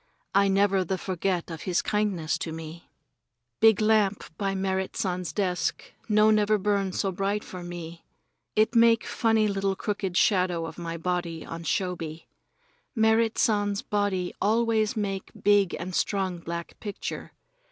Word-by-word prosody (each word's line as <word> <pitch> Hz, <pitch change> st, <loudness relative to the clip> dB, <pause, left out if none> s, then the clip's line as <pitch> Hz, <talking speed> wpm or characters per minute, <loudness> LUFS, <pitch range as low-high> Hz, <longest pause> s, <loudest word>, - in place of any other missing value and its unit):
I 200 Hz, 0 st, +4 dB
never 195 Hz, -1 st, +3 dB
the 185 Hz, +2 st, -2 dB
forget 185 Hz, -1 st, -2 dB
of 160 Hz, -1 st, -6 dB
his 180 Hz, -2 st, 0 dB
kindness 200 Hz, -7 st, 0 dB
to 165 Hz, -, -4 dB
me. 160 Hz, +1 st, -9 dB, 0.7 s
Big 220 Hz, -3 st, +6 dB
lamp 210 Hz, -5 st, +1 dB
by 195 Hz, +1 st, -1 dB
Merrit 190 Hz, 0 st, -2 dB
San's 180 Hz, -2 st, -2 dB
desk 185 Hz, -3 st, -2 dB, 0.2 s
no 215 Hz, 0 st, +5 dB
never 215 Hz, 0 st, +3 dB
burn 200 Hz, -1 st, 0 dB
so 195 Hz, +1 st, -1 dB
bright 195 Hz, +3 st, -1 dB
for 185 Hz, -, -8 dB
me. 170 Hz, -1 st, -8 dB, 0.5 s
It 215 Hz, +3 st, +3 dB
make 230 Hz, -1 st, +5 dB
funny 225 Hz, -2 st, +2 dB
little 195 Hz, -1 st, 0 dB
crooked 195 Hz, -3 st, -2 dB
shadow 180 Hz, -4 st, +2 dB
of 165 Hz, -, -8 dB
my 170 Hz, -1 st, -4 dB
body 170 Hz, -1 st, -3 dB
on 165 Hz, 0 st, -7 dB
shoji. 165 Hz, -4 st, -2 dB, 0.7 s
Merrit 220 Hz, 0 st, +3 dB
San's 205 Hz, 0 st, +1 dB
body 200 Hz, -5 st, -1 dB
always 220 Hz, 0 st, +2 dB
make 195 Hz, -2 st, -2 dB
big 205 Hz, -3 st, +3 dB
and 180 Hz, +2 st, -6 dB
strong 190 Hz, -2 st, 0 dB
black 170 Hz, 0 st, -6 dB
picture. 205 Hz, -2 st, -6 dB
195 Hz, 145 wpm, -27 LUFS, 175-210 Hz, 0.7 s, Big